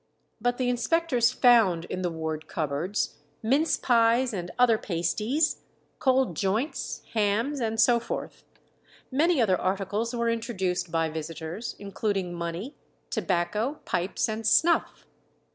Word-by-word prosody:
But 245 Hz, +1 st, +1 dB
the 255 Hz, -, 0 dB
inspectors 245 Hz, 0 st, +2 dB
found 225 Hz, -11 st, +4 dB
in 185 Hz, -, -4 dB
the 180 Hz, -, 0 dB
ward 160 Hz, -1 st, -4 dB
cupboards 160 Hz, +6 st, -2 dB, 0.3 s
mince 275 Hz, +8 st, +2 dB
pies 235 Hz, 0 st, +3 dB
and 175 Hz, -3 st, -4 dB
other 240 Hz, -3 st, +4 dB
pasties, 210 Hz, -, 0 dB, 0.4 s
cold 260 Hz, -8 st, +2 dB
joints, 215 Hz, -, -2 dB
hams, 225 Hz, +6 st, +1 dB
and 225 Hz, -2 st, -1 dB
so 240 Hz, 0 st, +5 dB
forth. -, -, -6 dB, 0.7 s
Many 315 Hz, +4 st, +3 dB
other 190 Hz, -6 st, +2 dB
articles 200 Hz, +5 st, -1 dB
were 235 Hz, 0 st, 0 dB
introduced 190 Hz, -7 st, -2 dB
by 165 Hz, -1 st, +1 dB
visitors, 160 Hz, +6 st, -5 dB
including 200 Hz, -2 st, -2 dB
money, 170 Hz, -, -4 dB, 0.4 s
tobacco, 210 Hz, -, -1 dB
pipes, 180 Hz, +2 st, -1 dB
and 220 Hz, 0 st, -3 dB
snuff. 335 Hz, +9 st, +2 dB
220 Hz, 125 wpm, -27 LUFS, 180-245 Hz, 0.7 s, so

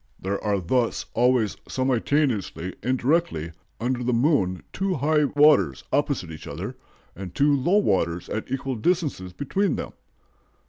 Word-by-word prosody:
"There 100 Hz, +1 st, -3 dB
are 105 Hz, -2 st, +1 dB
thus 115 Hz, +7 st, 0 dB
always 120 Hz, -2 st, +2 dB
simultaneously 125 Hz, -, 0 dB
and 130 Hz, +1 st, 0 dB
directly 125 Hz, -, 0 dB, 0.3 s
under 125 Hz, +1 st, -1 dB
the 125 Hz, +1 st, 0 dB
moon 115 Hz, -, +2 dB
two 195 Hz, -1 st, -1 dB
high 150 Hz, +1 st, +2 dB
waters 145 Hz, -, +4 dB
opposite 140 Hz, -, 0 dB
each 80 Hz, -, -9 dB
other, -, -, -5 dB, 0.4 s
and 90 Hz, -1 st, -8 dB
two 145 Hz, +1 st, +4 dB
low 170 Hz, +9 st, +2 dB
waters 90 Hz, -, +1 dB
at 110 Hz, -, -4 dB
equal 135 Hz, -1 st, -2 dB
distances 145 Hz, -, -1 dB
between 155 Hz, -, -1 dB
them. -, -, -5 dB
125 Hz, 140 wpm, -25 LUFS, 95-145 Hz, 0.4 s, waters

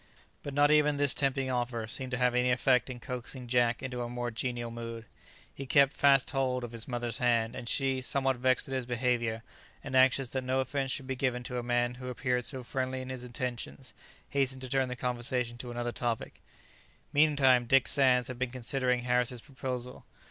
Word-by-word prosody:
But 140 Hz, -1 st, -6 dB
not 145 Hz, +1 st, +5 dB
even 150 Hz, -1 st, +4 dB
this 145 Hz, -1 st, +2 dB
tempting 135 Hz, -1 st, 0 dB
offer 120 Hz, -2 st, -2 dB
seemed 130 Hz, +3 st, -3 dB
to 125 Hz, -, -2 dB
have 125 Hz, -1 st, +2 dB
any 125 Hz, 0 st, +2 dB
effect 125 Hz, +1 st, +3 dB
in 125 Hz, -1 st, -6 dB
coaxing 125 Hz, 0 st, -6 dB
Jack 120 Hz, 0 st, +1 dB
into 125 Hz, -2 st, -4 dB
a 120 Hz, -, -3 dB
more 120 Hz, 0 st, -3 dB
genial 120 Hz, 0 st, -3 dB
mood. 115 Hz, -1 st, -7 dB, 0.5 s
He 135 Hz, -, -7 dB
kept 140 Hz, 0 st, +5 dB
fast 140 Hz, -2 st, +4 dB
hold 130 Hz, -2 st, 0 dB
of 120 Hz, -, -6 dB
his 115 Hz, -1 st, -5 dB
mother's 120 Hz, -2 st, -2 dB
hand, 115 Hz, -2 st, +2 dB
and 120 Hz, -, -5 dB
she, 135 Hz, -2 st, +1 dB
somewhat 135 Hz, 0 st, +1 dB
vexed 130 Hz, +1 st, +2 dB
at 135 Hz, -, -5 dB
his 130 Hz, -2 st, -2 dB
behaviour, 120 Hz, -2 st, 0 dB, 0.4 s
and 135 Hz, -1 st, -4 dB
anxious 130 Hz, 0 st, +4 dB
that 130 Hz, 0 st, -3 dB
no 130 Hz, +1 st, 0 dB
offence 135 Hz, +1 st, -1 dB
should 130 Hz, +1 st, -1 dB
be 130 Hz, 0 st, -3 dB
given 125 Hz, -1 st, -1 dB
to 125 Hz, 0 st, -4 dB
a -, -, -2 dB
man 120 Hz, 0 st, 0 dB
who 125 Hz, -, -6 dB
appeared 125 Hz, -1 st, -1 dB
so 130 Hz, -3 st, -1 dB
friendly 130 Hz, +1 st, -3 dB
in 130 Hz, -, -8 dB
his 130 Hz, -1 st, -6 dB
intentions, 125 Hz, +1 st, -5 dB, 0.4 s
hastened 130 Hz, -2 st, 0 dB
to 130 Hz, -, -6 dB
turn 135 Hz, -1 st, +1 dB
the 125 Hz, -, -4 dB
conversation 125 Hz, -1 st, -1 dB
to 125 Hz, -, -6 dB
another 120 Hz, 0 st, -3 dB
topic. 120 Hz, -2 st, -3 dB, 0.7 s
Meantime 140 Hz, -5 st, +4 dB
Dick 135 Hz, +1 st, +4 dB
Sands 130 Hz, -3 st, +3 dB
had 125 Hz, -1 st, -7 dB
been 130 Hz, -1 st, 0 dB
considering 125 Hz, 0 st, -1 dB
Harris's 125 Hz, -1 st, 0 dB
proposal. 125 Hz, -2 st, -6 dB
125 Hz, 200 wpm, -30 LUFS, 120-130 Hz, 0.7 s, not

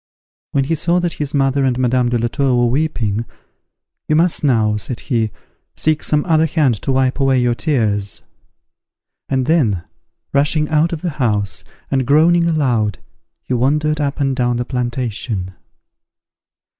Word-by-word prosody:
'" -, -, -90 dB
When 140 Hz, -, +2 dB
he 140 Hz, -, -1 dB
saw 170 Hz, +2 st, +1 dB
that 175 Hz, -1 st, -1 dB
his 145 Hz, 0 st, -2 dB
mother 135 Hz, 0 st, +2 dB
and 130 Hz, -2 st, +1 dB
Madame 125 Hz, -1 st, +1 dB
de 120 Hz, -, +1 dB
la 120 Hz, +1 st, 0 dB
Tour 135 Hz, +1 st, 0 dB
were 120 Hz, 0 st, +3 dB
weeping, 120 Hz, -7 st, -1 dB, 0.8 s
"You 155 Hz, -, +2 dB
must 165 Hz, +1 st, +2 dB
now," 110 Hz, -6 st, +2 dB
said 115 Hz, +3 st, -5 dB
he, 115 Hz, -5 st, 0 dB, 0.5 s
"seek 155 Hz, -1 st, +1 dB
some 150 Hz, -1 st, +1 dB
other 160 Hz, -1 st, +3 dB
hand 150 Hz, -5 st, +2 dB
to 135 Hz, -, -1 dB
wipe 130 Hz, +1 st, +1 dB
away 135 Hz, -1 st, +3 dB
your 120 Hz, -1 st, +2 dB
tears;" 110 Hz, -8 st, -1 dB, 1.1 s
and 130 Hz, -1 st, 0 dB
then, 120 Hz, -, +1 dB, 0.5 s
rushing 150 Hz, +2 st, +2 dB
out 155 Hz, +2 st, +2 dB
of 165 Hz, -1 st, -5 dB
the 175 Hz, -, -1 dB
house, 105 Hz, -4 st, 0 dB, 0.3 s
and 130 Hz, -2 st, 0 dB
groaning 170 Hz, +4 st, +4 dB
aloud, 120 Hz, -, +1 dB, 0.5 s
he -, -, -3 dB
wandered 150 Hz, +5 st, +1 dB
up 140 Hz, 0 st, -2 dB
and 135 Hz, -2 st, +1 dB
down 120 Hz, -2 st, 0 dB
the 120 Hz, -, -2 dB
plantation. 120 Hz, -6 st, -3 dB
135 Hz, 160 wpm, -18 LUFS, 120-150 Hz, 1.1 s, groaning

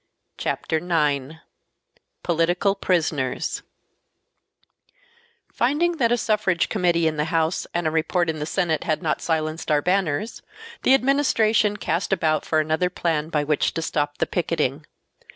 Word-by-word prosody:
Chapter 160 Hz, -, -1 dB
9 155 Hz, -3 st, -1 dB, 0.8 s
Political 175 Hz, +3 st, +1 dB
Prisoners 155 Hz, -9 st, -1 dB, 1.9 s
Finding 325 Hz, +7 st, +1 dB
that 235 Hz, -5 st, +2 dB
a 240 Hz, -, +3 dB
Suffrage 210 Hz, -6 st, +1 dB
Committee 175 Hz, -5 st, +1 dB
in 155 Hz, -1 st, 0 dB
the 150 Hz, -, 0 dB
House 165 Hz, 0 st, 0 dB
and 175 Hz, -1 st, -2 dB
a 155 Hz, -, +1 dB
report 165 Hz, +2 st, +1 dB
in 160 Hz, -1 st, -2 dB
the 150 Hz, -, -3 dB
Senate 165 Hz, -3 st, 0 dB
had 155 Hz, +3 st, -1 dB
not 155 Hz, -, -1 dB
silenced 160 Hz, 0 st, -2 dB
our 150 Hz, -1 st, +2 dB
banners, 190 Hz, +2 st, 0 dB, 0.4 s
the 265 Hz, -, +5 dB
Administration 230 Hz, -6 st, +2 dB
cast 170 Hz, +2 st, -2 dB
about 155 Hz, -5 st, +1 dB
for 155 Hz, -, +2 dB
another 155 Hz, +3 st, +1 dB
plan 160 Hz, -3 st, -1 dB
by 150 Hz, -3 st, 0 dB
which 150 Hz, 0 st, 0 dB
to 165 Hz, -, -2 dB
stop 145 Hz, -2 st, -2 dB
the -, -, +1 dB
picketing. -, -, -2 dB
165 Hz, 140 wpm, -23 LUFS, 155-195 Hz, 1.9 s, the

